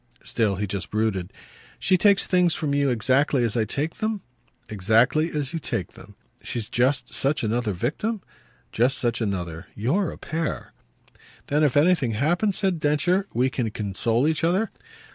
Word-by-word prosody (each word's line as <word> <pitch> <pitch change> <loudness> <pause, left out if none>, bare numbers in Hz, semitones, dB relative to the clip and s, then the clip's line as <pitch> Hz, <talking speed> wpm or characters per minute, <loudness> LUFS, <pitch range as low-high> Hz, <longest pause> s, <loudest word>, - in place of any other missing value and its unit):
Still 110 -4 0
he 100 +2 -2
just 100 -1 -4
brooded. 105 -4 -1 0.5
"She 185 - +2
takes 200 +2 +4
things 180 -3 +3
from 150 -4 -2
you 140 -1 +2
exactly 130 +3 +2
as 115 -1 0
I 115 -2 +2
take 145 +9 -3
them?" 215 -3 -2 0.4
"Exactly 115 - +2
as 145 0 -3
you 165 - -2
take 115 - -3
them." - - -15 0.3
"She's 115 -3 -4
just 130 +3 +1
such 140 0 0
another 115 0 0
victim?" 160 - -2 0.5
"Just 125 +4 +2
such 120 -1 -1
another. 90 -5 -3
You're 160 - 0
a - - -8
pair." 160 0 -4 0.8
"Then 150 +2 +2
if 145 -2 +3
anything 150 -6 +3
happens," 175 - +1
said 190 -5 0
Densher, 165 +6 +1
"we 130 +2 +2
can 120 -4 -1
console 110 +5 0
each 160 0 0
other?" 185 +6 +1
135 Hz, 160 wpm, -24 LUFS, 110-165 Hz, 0.8 s, takes